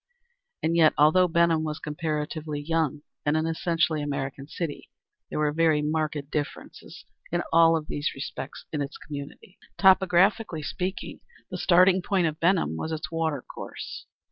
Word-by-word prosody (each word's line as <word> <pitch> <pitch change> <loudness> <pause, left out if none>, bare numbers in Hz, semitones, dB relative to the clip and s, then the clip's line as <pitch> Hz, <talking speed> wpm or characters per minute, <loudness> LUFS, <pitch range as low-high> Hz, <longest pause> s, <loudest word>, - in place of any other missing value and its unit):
And 165 +1 +1
yet, 160 -2 +5
although 160 +5 +5
Benham 170 -1 +3
was 155 -1 -3
a - - -15
comparatively 150 0 -3
young 150 -1 -1 0.2
and 145 +1 +2
an 155 - 0
essentially 165 -1 0
American 140 -1 -4
city, 155 -1 -5 0.4
there - - -4
were 150 -1 +2
very 155 -1 +2
marked 150 -2 -2
differences 150 -2 -6 0.3
in 175 +1 0
all 165 0 +6
these 145 0 -3
respects 135 0 -7
in 150 - -1
its 140 - -5
community. 145 +5 -9 0.2
Topographically 190 -1 +4
speaking 185 +5 -4 0.3
the - - -3
starting 185 +1 +5
point 185 -1 +1
of 155 -1 -2
Benham 170 - +2
was 160 - -4
its 155 0 -4
water 160 -5 -1
course. - - -8
155 Hz, 150 wpm, -26 LUFS, 150-170 Hz, 0.4 s, all